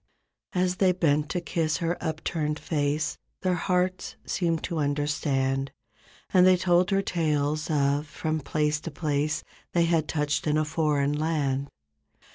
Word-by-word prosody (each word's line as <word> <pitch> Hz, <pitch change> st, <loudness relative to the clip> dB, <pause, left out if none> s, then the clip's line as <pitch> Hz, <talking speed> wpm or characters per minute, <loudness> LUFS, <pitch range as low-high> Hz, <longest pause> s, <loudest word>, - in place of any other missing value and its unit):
As 180 Hz, 0 st, +1 dB
they 185 Hz, -1 st, +4 dB
bent 150 Hz, -4 st, +1 dB
to 180 Hz, -, -1 dB
kiss 165 Hz, -2 st, -1 dB
her 170 Hz, -1 st, -1 dB
upturned 155 Hz, -1 st, -2 dB
face 150 Hz, -1 st, -1 dB, 0.2 s
Their 185 Hz, -1 st, +2 dB
hearts 180 Hz, +1 st, 0 dB
seemed 165 Hz, -3 st, 0 dB
to 170 Hz, -3 st, -2 dB
understand. 140 Hz, -2 st, 0 dB, 0.6 s
And 185 Hz, -2 st, +7 dB
they 185 Hz, -1 st, +6 dB
told 180 Hz, 0 st, +3 dB
her 195 Hz, -1 st, +2 dB
tales 150 Hz, -4 st, 0 dB
of 145 Hz, 0 st, +1 dB
from 155 Hz, +2 st, -2 dB
place 150 Hz, +1 st, 0 dB
to 165 Hz, -, -6 dB
place 150 Hz, 0 st, -1 dB, 0.3 s
They 170 Hz, -1 st, +4 dB
had 165 Hz, -2 st, +1 dB
touched 150 Hz, 0 st, -1 dB
in 150 Hz, 0 st, +2 dB
a 155 Hz, -, +2 dB
foreign 145 Hz, -2 st, +1 dB
land. 145 Hz, -3 st, 0 dB
155 Hz, 145 wpm, -27 LUFS, 145-170 Hz, 0.6 s, And